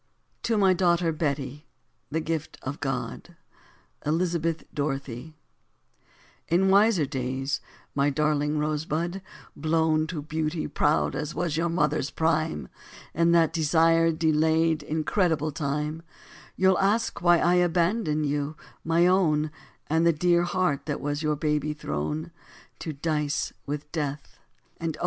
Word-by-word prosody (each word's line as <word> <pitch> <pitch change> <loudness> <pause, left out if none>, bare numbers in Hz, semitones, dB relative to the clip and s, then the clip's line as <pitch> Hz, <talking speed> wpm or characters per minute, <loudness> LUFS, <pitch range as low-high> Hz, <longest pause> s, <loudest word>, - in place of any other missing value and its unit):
TO 230 -2 0
MY 190 -2 +5
DAUGHTER 175 -2 +2
BETTY, 145 -1 -3 0.4
THE 160 +2 -1
GIFT 160 -1 -3
OF 135 +3 -5
GOD 135 +5 -4 0.7
(ELIZABETH 165 0 0
DOROTHY) 140 0 -4 1.1
In 185 +3 +3
wiser 200 -5 +4
days, 130 +1 -2 0.3
my 140 0 +2
darling 150 +1 +1
rosebud, 155 +4 -1 0.3
blown 155 0 +1
To 155 -3 -5
beauty 155 +1 -2
proud 150 +1 +1
as 150 +2 -4
was 170 -3 -1
your 170 +2 0
mother's 150 -4 +1
prime, 155 - 0 0.5
In 170 +1 +3
that 165 -1 +4
desired, 165 +1 +3
delayed, 160 0 +2
incredible 155 +1 0
time, 150 +2 -2 0.5
You'll 190 -1 +3
ask 205 +4 +1
why 175 -1 +5
I 175 +1 +3
abandoned 175 -2 +2
you, 145 +1 -2 0.3
my 165 +2 +3
own, 155 -5 +3 0.3
And 160 +2 +1
the 170 - +5
dear 175 +2 +3
heart 175 -5 0
that 150 - -2
was 145 +1 -2
your 155 -1 +1
baby 150 0 0
throne, 150 - -4 0.5
To 160 - -4
dice 150 0 -1
with 150 +1 -5
death. 150 -3 -4 0.4
And 160 -2 -3
oh! - - -17
155 Hz, 130 wpm, -26 LUFS, 150-170 Hz, 1.1 s, MY